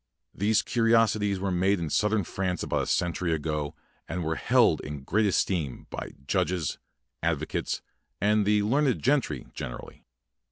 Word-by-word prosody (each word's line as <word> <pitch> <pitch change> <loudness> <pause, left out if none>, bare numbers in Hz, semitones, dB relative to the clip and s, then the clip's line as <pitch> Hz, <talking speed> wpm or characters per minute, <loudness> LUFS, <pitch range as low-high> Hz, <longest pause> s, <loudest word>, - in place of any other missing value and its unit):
These 105 +3 +2
curiosities 115 -4 +2
were 95 0 -1
made 95 +2 +2
in 80 -3 -3
southern 105 -1 +2
France 90 +1 -2
about - - 0
a - - -3
cen 85 -1 +1
tury 85 0 0
ago 75 -1 -3 0.3
and 85 +2 -3
were 80 0 0
held - - +3
in 75 -2 -7
great 105 +9 +2
esteem 85 -8 0
by - - -6
judges, 85 0 0 0.4
advocates, 80 -2 -1 0.4
and 105 +1 +3
the 105 0 +3
learned 135 +4 +1
gentry 125 - +1
generally. - - -8
95 Hz, 150 wpm, -27 LUFS, 80-105 Hz, 0.4 s, held